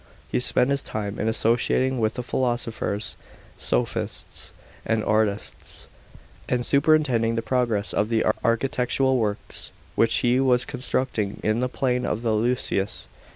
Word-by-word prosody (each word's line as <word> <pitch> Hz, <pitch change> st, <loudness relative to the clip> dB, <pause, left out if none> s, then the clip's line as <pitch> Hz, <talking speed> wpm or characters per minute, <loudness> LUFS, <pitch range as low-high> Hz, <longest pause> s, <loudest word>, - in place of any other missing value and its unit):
He -, -, +2 dB
spent 125 Hz, +1 st, +2 dB
his 140 Hz, -1 st, +2 dB
time 105 Hz, -1 st, -4 dB
in -, -, 0 dB
associating 120 Hz, +3 st, +2 dB
with 110 Hz, -1 st, +1 dB
the 125 Hz, -, -3 dB
philosophers, 120 Hz, -4 st, -1 dB, 0.4 s
sophists, -, -, -2 dB, 0.3 s
and 110 Hz, -1 st, 0 dB
artists, 110 Hz, -1 st, -1 dB, 0.6 s
and 120 Hz, -1 st, +1 dB
superintending 140 Hz, -6 st, +3 dB
the 115 Hz, -, -1 dB
progress 115 Hz, -3 st, 0 dB
of 105 Hz, +1 st, +1 dB
the 115 Hz, -1 st, +2 dB, 0.2 s
architectural 125 Hz, +2 st, +2 dB
works 105 Hz, -2 st, -3 dB, 0.2 s
which 115 Hz, 0 st, +3 dB
he 120 Hz, +1 st, +4 dB
was 125 Hz, -2 st, +3 dB
constructing 125 Hz, -5 st, -1 dB
in 110 Hz, +2 st, +1 dB
the 125 Hz, +1 st, 0 dB
plain 125 Hz, -1 st, 0 dB
of 115 Hz, -1 st, -2 dB
the 115 Hz, -, +1 dB
Ilissus. 110 Hz, -3 st, 0 dB
120 Hz, 135 wpm, -25 LUFS, 110-125 Hz, 0.6 s, he